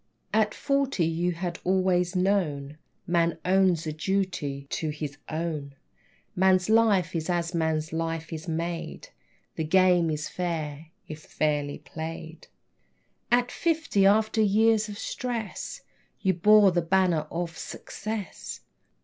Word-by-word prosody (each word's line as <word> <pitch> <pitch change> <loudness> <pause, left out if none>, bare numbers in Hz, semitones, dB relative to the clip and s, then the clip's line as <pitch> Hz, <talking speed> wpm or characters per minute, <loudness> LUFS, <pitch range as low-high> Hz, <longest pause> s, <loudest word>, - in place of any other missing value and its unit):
At 215 -1 +2
forty 275 - +1
you 170 +2 0
had 170 0 -4
always 185 -1 +2
known 155 -7 0 0.3
Man 170 -2 +1
owes 185 -3 +3
a 155 - -3
duty 165 -5 -2
to 160 - -2
His 150 -1 -5
Own. 155 -3 -3 0.6
Man's 185 +2 +3
life 210 -7 +3
is 160 +1 -2
as 175 0 0
man's 160 -1 -1
life 165 0 -3
is 160 +2 -6
made; 170 - -4 0.5
The 160 - 0
game 180 0 +4
is 155 0 -2
fair, 160 -4 -4 0.2
if 155 0 -7
fairly 145 -2 -1
played. 160 0 -8 0.8
At 245 +1 +3
fifty, 320 - +2
after 220 +2 +3
years 215 +1 +3
of 205 - -7
stress 240 - -4 0.4
You 190 -2 +2
bore 205 +3 +6
the 175 0 +1
banner 170 -3 +2
of 170 -1 -4
Success. 215 +1 -6
175 Hz, 125 wpm, -27 LUFS, 160-200 Hz, 0.8 s, bore